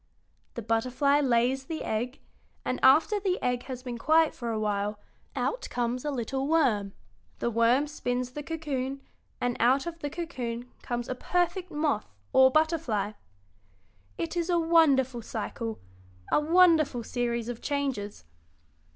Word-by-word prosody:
The 235 - -5
butterfly 255 +6 +2
lays 260 0 +2
the 320 +2 -4
egg, 240 +5 -3 0.4
and 255 - -1
after 315 +10 +5
the 375 -2 0
egg 245 -1 -1
has 255 -2 -6
been 245 -2 -5
quiet 320 +4 +4
for 240 -2 -5
a 220 -1 -1
while 205 0 -1 0.4
out - - -2
comes 245 +1 -2
a 300 - -1
little 265 +1 -2
worm; 235 -11 +2 0.4
the 235 - -1
worm 235 +5 +3
spins 250 -4 -3
the 295 - -6
cocoon, 275 -4 -4 0.4
and 245 -1 0
out 260 +4 +3
of 340 -1 -6
the 290 - -3
cocoon 250 -8 -5
comes 240 -1 -3
a - - -2
perfect 355 +6 -1
moth, 295 -8 -1 0.2
or 260 0 +7
butterfly. 295 - +1 1.1
It 165 - -3
is 340 0 -1
a 350 - +3
wonderful 285 -7 +3
cycle, 225 0 -5 0.5
a - - +5
wonderful 315 -5 +4
series 235 -1 -2
of 245 -1 -5
changes. 270 - -3
260 Hz, 145 wpm, -28 LUFS, 235-310 Hz, 1.1 s, or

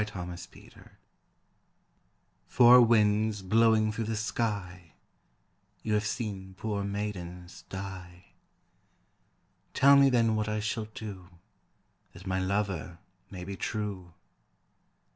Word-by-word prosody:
Four 105 -4 -5
Winds 90 0 -12 1.6
"Four 125 0 +7
winds 110 -2 +2
blowing 110 +2 +3
through 110 +1 -4
the 110 +1 -2
sky, 100 -6 -3 0.9
You 110 - -1
have 105 0 +1
seen 95 -4 -5
poor 105 -2 -3
maidens 95 -3 -6
die, 95 -2 -9 1.4
Tell 140 +1 +6
me 140 0 +6
then 115 -3 +2
what 105 0 -1
I 105 0 -1
shall 110 +1 -3
do 95 -4 -8 0.8
That 90 +1 -13
my 95 0 -1
lover 95 -3 -2 0.3
may 90 -2 -8
be 100 +2 -6
true." 95 -5 -5
105 Hz, 105 wpm, -29 LUFS, 95-110 Hz, 1.6 s, Four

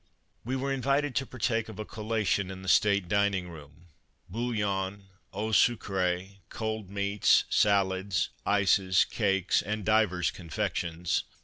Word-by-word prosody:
We 125 +3 -2
were 135 +1 -1
invited 135 +2 0
to 135 -2 -1
partake 115 -2 -1
of 110 - -9
a 110 - -5
collation 105 -4 -1
in 95 0 -8
the - - -9
state 100 -1 +3
dining 100 -2 +1
room 75 0 -13 0.2
— - - -41
bouillon, 100 -3 -2 0.3
eau 105 +3 -3
sucree, 95 -4 +1
cold 110 -3 -4
meats, 100 0 +2
salads, 95 -2 +2
ices, 95 -2 +3
cakes 95 -4 +1
and 105 0 -4
divers 105 -5 +2
confections. 90 -2 -2
100 Hz, 130 wpm, -28 LUFS, 95-110 Hz, 0.3 s, state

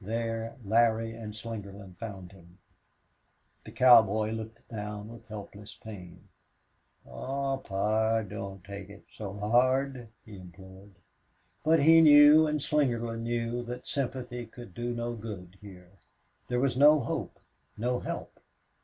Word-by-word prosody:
There 115 +2 -3
Larry 115 +1 +2
and 110 -2 -8
Slingerland 100 -4 -8
found 95 -5 -8
him. 85 -2 -18 1.1
The - - -10
cowboy 110 -4 +5
looked 110 0 -7
down 105 -1 -6
with 115 -1 -13
helpless 105 -1 -10
pain. 90 -6 -11 0.8
"Aw, 135 - -3
pard 110 0 0
don't 100 -2 -7
take 100 0 -9
it 100 0 -14
so 100 -2 -6
hard," 125 +4 +1 0.2
he 105 -3 -11
implored. 95 +2 -14 0.7
But 160 0 +4
he 165 +3 +7
knew 150 0 +8
and 150 0 -1
Slingerland 120 -6 0
knew 120 +1 -2
that 125 +1 -7
sympathy 125 -3 -3
could 120 -3 -12
do 120 +3 -3
no 120 0 -3
good 100 -5 -9
here. 90 -3 -13 0.6
There 125 - 0
was 135 -1 +1
no 150 +2 +6
hope, 115 - -4 0.4
no 125 +3 -1
help. - - -6
115 Hz, 130 wpm, -29 LUFS, 100-125 Hz, 1.1 s, knew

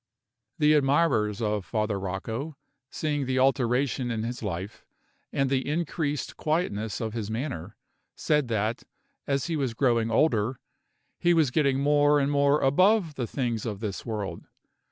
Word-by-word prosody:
The 150 -1 +4
admirers 135 -7 +2
of 105 -2 0
Father 105 -1 -1
Rocco, 110 - -4 0.3
seeing 145 -3 -2
the 130 0 0
alteration 130 -1 +1
in 110 -2 -2
his 120 +2 -4
life, 95 -1 -5 0.5
and 135 -1 +1
the 135 +1 0
increased 150 -2 -2
quietness 110 - -1
of 110 -2 -3
his 110 -3 -4
manner, 110 - -4 0.4
said 150 -3 +1
that, 110 0 -1 0.5
as 140 -1 0
he 170 - -2
was 135 -6 -1
growing 115 -3 +2
older, 115 -1 +2 0.6
he 175 0 +3
was 155 -6 +3
getting 140 -1 +2
more 145 0 +4
and 140 0 +1
more 140 +1 +3
above 185 +5 +3
the 125 -4 -3
things 120 -5 -2
of 105 -4 -4
this 105 -3 -4
world. 100 -6 -5
130 Hz, 150 wpm, -27 LUFS, 110-145 Hz, 0.6 s, The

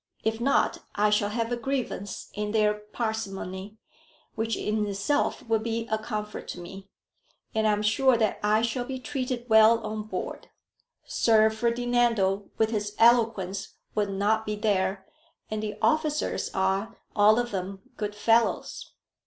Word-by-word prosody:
If 220 +1 -1
not, 275 +3 +2 0.2
I 210 +1 +3
shall 205 -1 +2
have 230 +2 -2
a - - +1
grievance 240 -6 -4
in 210 0 -3
their 210 -1 +3
parsimony, 210 -2 -5 0.6
which 225 0 -1
in 215 0 -1
itself 215 +6 -1
will 225 -1 +2
be 230 +1 -3
a 220 - +1
comfort 215 -1 -5
to - - -6
me; 195 +3 -10 0.6
and 220 0 +2
I - - +4
am 210 0 0
sure 245 +4 +4
that 220 -2 0
I 215 +2 +2
shall 235 +1 -1
be 260 +1 -5
treated 250 -1 -3
well 220 0 +7
on 215 0 -3
board. - - -5 0.6
Sir 220 -1 +4
Ferdinando 235 -4 +1
with 220 0 +2
his 210 -1 -2
eloquence 220 -5 +2 0.2
will 205 -2 0
not 205 +3 +1
be 210 -1 -3
there, 195 -2 0 0.5
and 215 0 -2
the 210 -1 -4
officers 310 -1 +1
are, 190 +3 -1 0.2
all 210 +1 +6
of 240 0 -1
them, 190 0 -5
good 210 -1 -4
fellows. 230 +2 +1
215 Hz, 155 wpm, -27 LUFS, 205-230 Hz, 0.6 s, well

